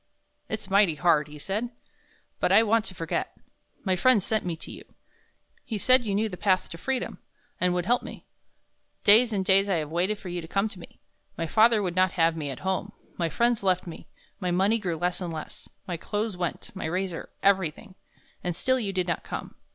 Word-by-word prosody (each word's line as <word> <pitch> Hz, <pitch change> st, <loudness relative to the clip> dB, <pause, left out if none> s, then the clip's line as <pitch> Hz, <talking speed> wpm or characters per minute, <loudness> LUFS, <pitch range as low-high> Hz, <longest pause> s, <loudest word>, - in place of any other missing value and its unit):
"It's 215 Hz, -2 st, -4 dB
mighty 195 Hz, -4 st, +4 dB
hard," 155 Hz, -2 st, +3 dB
he 150 Hz, 0 st, -11 dB
said, 205 Hz, +10 st, -3 dB, 0.7 s
"but -, -, +1 dB
I 225 Hz, -, +7 dB
want 225 Hz, 0 st, +2 dB
to 185 Hz, -, -6 dB
forget. 165 Hz, -1 st, -3 dB, 0.5 s
My 190 Hz, -2 st, +1 dB
friend 215 Hz, +2 st, +4 dB
sent 220 Hz, +1 st, 0 dB
me 175 Hz, -2 st, -2 dB
to 160 Hz, -, -9 dB
you. -, -, -10 dB, 0.8 s
He 220 Hz, -, -4 dB
said 255 Hz, +2 st, +4 dB
you 200 Hz, -, 0 dB
knew 215 Hz, +2 st, +1 dB
the 180 Hz, -4 st, -7 dB
path 185 Hz, -1 st, +1 dB
to 165 Hz, -, -8 dB
freedom, 265 Hz, +3 st, -2 dB, 0.4 s
and 180 Hz, 0 st, +2 dB
would 175 Hz, -1 st, -1 dB
help 245 Hz, +5 st, +2 dB
me. -, -, -10 dB, 0.8 s
Days 225 Hz, +4 st, +7 dB
and 195 Hz, -3 st, -1 dB
days 195 Hz, +1 st, +4 dB
I 190 Hz, -, +2 dB
have 155 Hz, -2 st, -2 dB
waited 185 Hz, +5 st, 0 dB
for 190 Hz, -, -8 dB
you 175 Hz, 0 st, -3 dB
to 165 Hz, -, -9 dB
come 195 Hz, +4 st, +1 dB
to 195 Hz, -, -12 dB
me. -, -, -13 dB, 0.4 s
My 165 Hz, -, -1 dB
father 220 Hz, +4 st, +4 dB
would 180 Hz, -2 st, -2 dB
not 185 Hz, 0 st, +3 dB
have 165 Hz, -2 st, +3 dB
me 150 Hz, -3 st, -4 dB
at 135 Hz, -, -7 dB
home, 190 Hz, 0 st, -2 dB, 0.3 s
my 170 Hz, -1 st, +1 dB
friends 235 Hz, +4 st, +1 dB
left 185 Hz, -2 st, +1 dB
me, 170 Hz, -, -9 dB, 0.3 s
my 185 Hz, -3 st, -2 dB
money 195 Hz, +6 st, +2 dB
grew 175 Hz, -5 st, -2 dB
less 175 Hz, +3 st, -1 dB
and 175 Hz, -2 st, -3 dB
less 155 Hz, -1 st, -8 dB, 0.2 s
my 175 Hz, -4 st, -3 dB
clothes 210 Hz, +4 st, -3 dB
went, 175 Hz, -2 st, -4 dB
my 190 Hz, -, -4 dB
razor 180 Hz, +1 st, -3 dB
everything. 195 Hz, 0 st, +1 dB, 0.5 s
And 175 Hz, -1 st, -2 dB
still 260 Hz, +7 st, +1 dB
you 205 Hz, -5 st, -2 dB
did 185 Hz, -2 st, -1 dB
not 170 Hz, -, -1 dB
come. -, -, -6 dB
190 Hz, 215 wpm, -27 LUFS, 175-210 Hz, 0.8 s, I